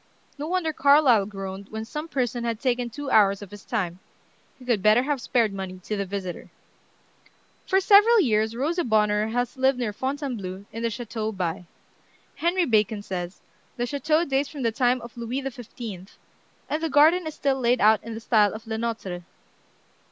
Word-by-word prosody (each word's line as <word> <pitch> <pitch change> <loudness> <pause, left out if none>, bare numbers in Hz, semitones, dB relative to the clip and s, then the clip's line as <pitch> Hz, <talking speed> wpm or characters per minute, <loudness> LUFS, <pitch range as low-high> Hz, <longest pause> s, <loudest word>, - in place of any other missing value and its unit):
No 295 - -3
wonder 340 -2 0
Carlyle 280 -8 +5
groaned 195 -1 -7
when 220 0 -5
some 300 +7 -6
person 245 -5 -2
had 230 -2 -2
taken 245 -2 0
two 285 +4 -6
hours 200 -1 +4
of 195 - -12
his 205 0 -11
time. 185 -6 -3 0.6
He 255 - -15
could 235 -5 +1
better 215 +5 +5
have 285 -2 -1
spared 230 -4 +1
money 190 -1 -6
to 215 - -3
the 200 -1 -3
visitor. 185 -2 -5 1.2
For 380 - +3
several 420 +4 +6
years 220 - +1
Rosa 325 +8 0
Bonheur 210 -2 +2
has 245 +2 -2
lived 265 0 +3
near 235 -4 -2
Fontainebleau, 240 -8 -4
in 225 - -5
the 230 - 0
Chateau 220 -1 -4
By. 180 -3 -3 0.7
Henry 345 +2 +1
Bacon 215 -4 +1
says: 180 -2 -5 0.4
"The 240 - 0
chateau 305 +5 +1
dates 275 0 0
from 285 -4 -6
the 230 - +2
time 245 +2 +1
of 235 0 -11
Louis 240 +3 -3
XV., 225 -6 -9 0.5
and 305 - -2
the 325 - -1
garden 315 +4 +5
is 310 - -6
still 270 -1 0
laid 245 0 +2
out 215 0 +4
in 230 0 -6
the - - -5
style 215 -3 +3
of 215 - -9
Le 220 0 -4
Notre. 220 -6 -4
235 Hz, 180 wpm, -25 LUFS, 210-275 Hz, 1.2 s, several